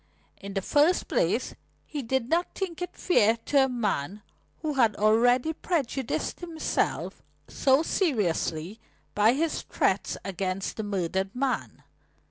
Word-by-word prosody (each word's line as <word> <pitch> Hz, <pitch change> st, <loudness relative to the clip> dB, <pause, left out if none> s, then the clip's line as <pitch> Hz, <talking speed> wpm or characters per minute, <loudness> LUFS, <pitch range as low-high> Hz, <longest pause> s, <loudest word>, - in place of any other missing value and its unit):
In 200 Hz, 0 st, -8 dB
the 195 Hz, -, -1 dB
first 305 Hz, -, +3 dB
place, -, -, 0 dB, 0.3 s
he 295 Hz, -, -5 dB
did 260 Hz, 0 st, -1 dB
not 335 Hz, +5 st, 0 dB
think 360 Hz, -3 st, -4 dB
it 360 Hz, -, -5 dB
fair 225 Hz, -, +3 dB
to 275 Hz, -2 st, +4 dB
a -, -, -3 dB
man 210 Hz, -, -2 dB, 0.4 s
who 305 Hz, -1 st, -1 dB
had 230 Hz, -6 st, +3 dB
already 245 Hz, +7 st, +3 dB
prejudiced 275 Hz, -7 st, -2 dB
himself 335 Hz, -3 st, -2 dB, 0.3 s
so 270 Hz, +3 st, +3 dB
seriously 205 Hz, -, -1 dB, 0.3 s
by 215 Hz, +3 st, +4 dB
his 315 Hz, +4 st, -1 dB
threats -, -, 0 dB
against 190 Hz, 0 st, -3 dB
the 220 Hz, -, -2 dB
murdered 190 Hz, 0 st, -2 dB
man. 260 Hz, 0 st, -2 dB
245 Hz, 130 wpm, -27 LUFS, 200-300 Hz, 0.4 s, to